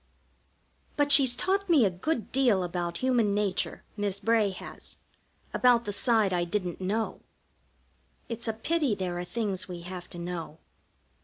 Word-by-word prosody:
But 290 Hz, -1 st, +2 dB
she's 270 Hz, -3 st, +7 dB
taught 390 Hz, +6 st, 0 dB
me 295 Hz, -9 st, +6 dB
a 195 Hz, -, +2 dB
good 225 Hz, -, -2 dB
deal 245 Hz, -8 st, +3 dB
about 175 Hz, -1 st, -3 dB
Human 235 Hz, -6 st, +3 dB
Nature, 205 Hz, -3 st, -1 dB
Miss 205 Hz, -2 st, -2 dB
Bray 225 Hz, -1 st, +3 dB
has. 190 Hz, -, -8 dB, 0.6 s
About 245 Hz, -2 st, +4 dB
the 205 Hz, -, -2 dB
side 220 Hz, -3 st, +2 dB
I 175 Hz, -1 st, +1 dB
didn't 180 Hz, 0 st, -3 dB
know. 210 Hz, +4 st, -2 dB, 1.1 s
It's 235 Hz, 0 st, -5 dB
a 225 Hz, -, 0 dB
pity 280 Hz, +1 st, 0 dB
there 180 Hz, -2 st, -3 dB
are -, -, -3 dB
things 195 Hz, -1 st, -3 dB
we 175 Hz, -2 st, -7 dB
have 180 Hz, 0 st, -8 dB
to -, -, -9 dB
know. 170 Hz, -3 st, -5 dB
205 Hz, 155 wpm, -28 LUFS, 180-240 Hz, 1.1 s, she's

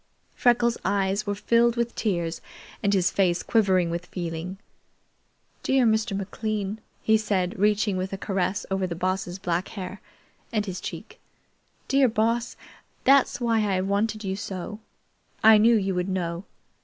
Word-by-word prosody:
Freckles' 240 Hz, -1 st, +2 dB
eyes 195 Hz, +2 st, 0 dB
were 205 Hz, -, 0 dB
filled 235 Hz, +3 st, +3 dB
with 235 Hz, 0 st, -1 dB
tears 170 Hz, -6 st, -1 dB, 0.4 s
and 200 Hz, -, +2 dB
his 185 Hz, -3 st, +2 dB
face 180 Hz, -3 st, +1 dB
quivering 190 Hz, -6 st, +2 dB
with 170 Hz, +1 st, -4 dB
feeling. 175 Hz, +1 st, -5 dB, 1.0 s
"Dear 265 Hz, -2 st, +2 dB
Mr. 220 Hz, -2 st, +1 dB
McLean," 205 Hz, +1 st, -3 dB, 0.2 s
he 220 Hz, 0 st, +4 dB
said, 190 Hz, -4 st, -1 dB
reaching 210 Hz, -1 st, +2 dB
with 185 Hz, +1 st, -3 dB
a 195 Hz, -, -3 dB
caress 195 Hz, 0 st, -1 dB
over 190 Hz, -1 st, 0 dB
the 170 Hz, -, -4 dB
Boss's 185 Hz, 0 st, -2 dB
black 180 Hz, -1 st, -1 dB
hair 190 Hz, -1 st, -7 dB, 0.5 s
and 210 Hz, -3 st, 0 dB
his 185 Hz, -2 st, -5 dB
cheek. -, -, -8 dB, 0.7 s
"Dear 270 Hz, -1 st, +4 dB
Boss, 230 Hz, +2 st, 0 dB, 0.5 s
that's 275 Hz, +1 st, +4 dB
why 230 Hz, -2 st, +2 dB, 0.2 s
I've 185 Hz, -, -1 dB
wanted 215 Hz, +2 st, 0 dB
you 190 Hz, -1 st, -2 dB
so. 195 Hz, +1 st, -6 dB, 0.6 s
I 220 Hz, 0 st, +8 dB
knew 230 Hz, +2 st, +5 dB
you 195 Hz, -2 st, 0 dB
would 180 Hz, +1 st, -1 dB
know. 175 Hz, -1 st, -3 dB
200 Hz, 150 wpm, -25 LUFS, 185-220 Hz, 1.0 s, I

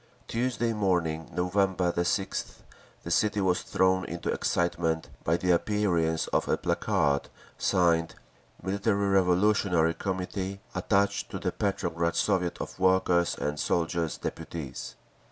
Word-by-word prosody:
Tuesday 120 Hz, -1 st, 0 dB
morning, 90 Hz, -6 st, 0 dB
November 90 Hz, 0 st, +1 dB
6th, 90 Hz, +3 st, -2 dB, 0.4 s
the 85 Hz, -, -5 dB
city 105 Hz, +3 st, +2 dB
was 95 Hz, -2 st, +2 dB
thrown 95 Hz, 0 st, +2 dB
into 85 Hz, 0 st, -3 dB
excitement 85 Hz, -2 st, 0 dB
by 80 Hz, +2 st, +2 dB
the 90 Hz, +1 st, +1 dB
appearance 85 Hz, -4 st, +1 dB
of -, -, 0 dB
a -, -, +2 dB
placard 70 Hz, -1 st, 0 dB, 0.3 s
signed, 85 Hz, -3 st, +2 dB, 0.5 s
"Military 100 Hz, +1 st, 0 dB
Revolutionary 90 Hz, -2 st, +3 dB
Committee 95 Hz, +2 st, -3 dB
attached 100 Hz, +2 st, +1 dB
to -, -, -5 dB
the -, -, -2 dB
Petrograd 85 Hz, +1 st, -1 dB
Soviet 90 Hz, -4 st, +1 dB
of -, -, -6 dB
Workers' 95 Hz, -2 st, +3 dB
and 75 Hz, 0 st, -2 dB
Soldiers' 85 Hz, -1 st, 0 dB
Deputies." 80 Hz, -4 st, -6 dB
90 Hz, 120 wpm, -28 LUFS, 85-100 Hz, 0.5 s, Revolutionary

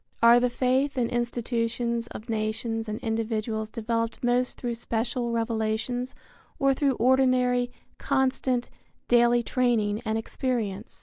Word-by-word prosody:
Are 235 Hz, +1 st, +8 dB
the 250 Hz, 0 st, +2 dB
faith 260 Hz, +3 st, +1 dB
and 235 Hz, -2 st, 0 dB
institutions 235 Hz, -1 st, -1 dB
of 220 Hz, -, -9 dB
nations 225 Hz, 0 st, -2 dB
and 215 Hz, -, -3 dB
individuals 220 Hz, -1 st, -2 dB
developed 230 Hz, +1 st, -2 dB
most 245 Hz, +1 st, +1 dB
through 240 Hz, -2 st, -2 dB
special 235 Hz, +1 st, -2 dB
revelations 230 Hz, +2 st, -1 dB, 0.4 s
or 275 Hz, 0 st, +3 dB
through 275 Hz, 0 st, +1 dB
ordinary, 250 Hz, 0 st, +3 dB, 0.3 s
constant, 260 Hz, -2 st, 0 dB, 0.4 s
daily 240 Hz, 0 st, +4 dB
training 225 Hz, -4 st, +1 dB
and 220 Hz, -2 st, -1 dB
experience? 225 Hz, -3 st, -3 dB
235 Hz, 120 wpm, -26 LUFS, 225-250 Hz, 0.4 s, Are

